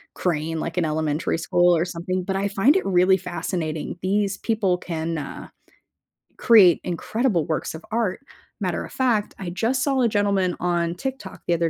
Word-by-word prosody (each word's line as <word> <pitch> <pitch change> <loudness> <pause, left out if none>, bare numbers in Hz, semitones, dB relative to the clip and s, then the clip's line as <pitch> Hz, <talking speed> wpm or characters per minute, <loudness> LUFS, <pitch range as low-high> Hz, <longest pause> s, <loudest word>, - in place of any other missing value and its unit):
crane, 160 -2 -1
like, 165 +1 -4
in 180 - +2
elementary 155 +1 -1
school 175 +2 +3
or 165 - +1
something, 180 +1 -3
but 190 +1 -3
I 200 +1 0
find 210 - +3
it 385 - +1
really 185 0 +4
fascinating. 165 -3 -4
These 200 +1 0
people 205 -6 0
can, 165 -2 -4
uh, 145 - -7 0.9
create 200 -8 +6
incredible 180 - -1
works 155 - -2
of 160 +5 -10
art. 220 -5 0 0.4
Matter - - -2
of - - -12
fact, 235 -5 0
I 185 -3 -4
just 230 +9 0
saw 270 -2 +1
a 240 - +4
gentleman 200 -3 +1
on 175 -1 0
TikTok 255 -1 -6
the 175 - +3
other 170 0 +1
180 Hz, 175 wpm, -23 LUFS, 170-205 Hz, 0.9 s, create